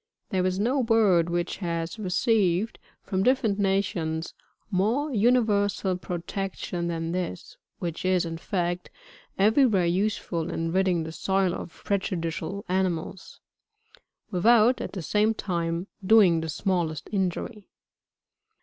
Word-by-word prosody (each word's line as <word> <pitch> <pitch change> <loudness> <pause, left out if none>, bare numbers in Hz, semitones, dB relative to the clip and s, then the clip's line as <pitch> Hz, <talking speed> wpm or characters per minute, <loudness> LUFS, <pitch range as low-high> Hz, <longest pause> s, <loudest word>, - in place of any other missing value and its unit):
There 185 -2 +1
is 185 0 -1
no 250 +7 +1
bird 210 -8 +3
which 175 0 -2
has 170 +1 -3
received, 200 0 +1 0.2
from 190 -2 -1
different 225 -3 +2
nations, 180 -5 -1 0.4
more 235 +10 +1
universal 205 -4 +2
pro 180 0 -4
tection 175 -1 -4
than 165 -1 -2
this, 180 - -4 0.2
which 170 -2 -4
is, 185 -1 +2
in 165 0 -5
fact, 175 -2 -2 0.5
every 220 +7 +5
where 195 -6 +2
useful 175 -2 -1
in 165 -1 -2
ridding 185 -2 +2
the 160 - -6
soil 190 +1 0
of - - -8
prejudicial 185 -1 -2
animals, 185 -1 -2 0.9
without, 230 +6 +4
at - - -5
the 185 -4 -5
same 215 +5 +2
time, 170 -3 -2 0.2
doing 185 -5 +5
the 160 - -4
smallest 170 -2 -1
injury. 200 +2 -3
185 Hz, 125 wpm, -26 LUFS, 170-210 Hz, 0.9 s, every